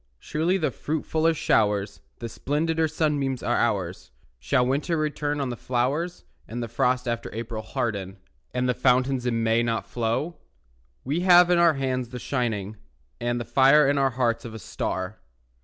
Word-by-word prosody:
Surely 160 - 0
the 160 -5 0
fruitfuller 160 +1 0
showers, 105 - +1 0.2
The - - -7
splendider 160 +6 -1
sunbeams 145 -5 -1
are - - +1
ours; - - -1 0.3
Shall 80 - +2
winter 145 +6 0
return 150 -1 -1
on 135 -2 -1
the 120 - -3
flowers, 135 +9 -2 0.2
And 120 +2 -4
the - - -4
frost 125 +2 0
after 115 -1 -2
April 115 -1 -4
harden, 100 -3 -3 0.3
And 125 0 -1
the 125 - +2
fountains 125 0 +2
in 115 -2 0
May 115 +1 +3
not 115 -1 -1
flow? 125 +8 -2 0.7
We 145 +6 -1
have 180 -1 +6
in 175 - +4
our 170 -3 +5
hands 130 -3 -2
the 125 - -7
shining 110 -6 -2 0.4
And 120 0 -1
the 120 - -4
fire 135 +5 +5
in 140 0 +2
our 135 -1 +3
hearts 115 -2 0
of 115 -3 -8
a - - -7
star. 95 0 -4
125 Hz, 170 wpm, -25 LUFS, 115-150 Hz, 0.7 s, have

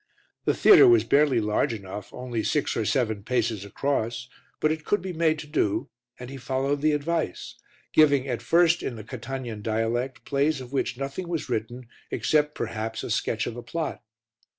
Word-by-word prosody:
The - - +2
theatre 405 -1 +8
was 360 -1 +6
barely 140 -4 +3
large 105 +4 +1
enough, 100 0 -8
only 125 -3 -4
six 150 - 0
or 110 - -1
seven 110 -5 0
paces 115 -2 -1
across, 125 +2 -2 0.3
but 155 - +2
it 155 0 -3
could 205 - +1
be 185 -1 -5
made 160 -1 +2
to 150 - -7
do, 120 -6 -1 0.3
and 125 +1 -8
he 135 - -7
followed 135 +2 -1
the 155 0 +3
advice, 155 - -2 0.4
giving, 140 -3 +5
at 120 -3 -2
first, 170 0 +3
in 120 - -4
the 110 - -8
Catanian 120 -1 -6
dialect, 115 +3 -2
plays 140 +1 +1
of 130 +1 -10
which 130 -2 -1
nothing 140 +7 -4
was 165 -5 -3
written 120 +1 -3 0.2
except, 150 -1 +1
perhaps, 110 0 -4
a - - -4
sketch 110 0 0
of - - -4
the 120 - -7
plot. 155 +7 -4
130 Hz, 180 wpm, -26 LUFS, 115-150 Hz, 0.4 s, theatre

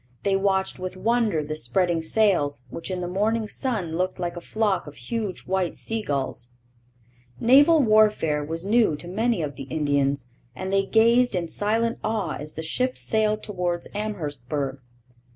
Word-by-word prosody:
They 200 -1 +2
watched 195 -1 0
with 185 0 -5
wonder 225 -6 +1
the 155 +1 -4
spreading 165 +5 +1
sails, 160 - +1
which 165 - -6
in 185 -1 -3
the 175 - -3
morning 215 +4 0
sun 205 - -2
looked 185 +1 -1
like 175 -1 -3
a 175 - -6
flock 210 -3 0
of 145 - -10
huge 200 - -4
white 185 -2 -1
sea 225 0 -2
gulls. 135 - -3 0.9
Naval 285 +6 +6
warfare 210 - +3
was 165 +4 -4
new 215 -6 +3
to 170 - -9
many 215 0 0
of 140 -3 -5
the 135 - -6
Indians, 140 -3 0 0.3
and 190 +6 -4
they 195 0 +2
gazed 235 +1 +4
in 175 -2 -1
silent 225 +6 0
awe 215 -7 -1
as 150 +1 -8
the 160 - -5
ships 255 +10 0
sailed 215 -1 +1
towards 180 -4 -2
Amherstburg. 145 - -3
185 Hz, 165 wpm, -25 LUFS, 155-215 Hz, 0.9 s, Naval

